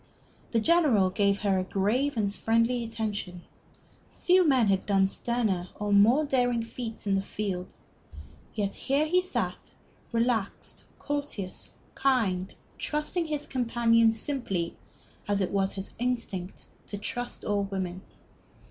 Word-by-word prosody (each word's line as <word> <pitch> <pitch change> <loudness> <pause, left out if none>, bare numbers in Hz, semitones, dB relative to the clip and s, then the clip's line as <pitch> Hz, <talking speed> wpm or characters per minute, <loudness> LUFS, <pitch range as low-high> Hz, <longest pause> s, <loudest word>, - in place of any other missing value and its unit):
The 230 - +2
General 245 - +4
gave 200 0 +1
her 195 -3 +2
a - - 0
grave 230 +9 0
and 200 -2 +1
friendly 230 +3 +1
attention. 210 -6 -4 0.8
Few 365 +1 +6
men 260 -5 +4
had 195 -1 +1
done 195 -2 +4
sterner 195 -4 -1
or 205 0 -1
more 230 +9 +5
daring 245 -4 +1
feats 230 -1 -6
in 200 - +1
the 195 - +2
field. 195 -3 -4 0.8
Yet 200 -2 -1
here 280 +3 +1
he 360 +4 +3
sat, 365 - -3 0.4
relaxed, 230 -3 -1
courteous, 285 -10 -5 0.2
kind, 200 -9 +1 0.3
trusting 305 +3 -1
his 300 -1 -2
companions 230 -2 +3
simply, 195 - -2 0.5
as 205 -1 +1
it 190 - 0
was 195 -1 +1
his 195 0 -5
instinct 230 -7 -3 0.2
to 205 - -5
trust 245 +4 -4
all 205 -1 +1
women. 190 -2 -4
225 Hz, 130 wpm, -28 LUFS, 195-250 Hz, 0.8 s, Few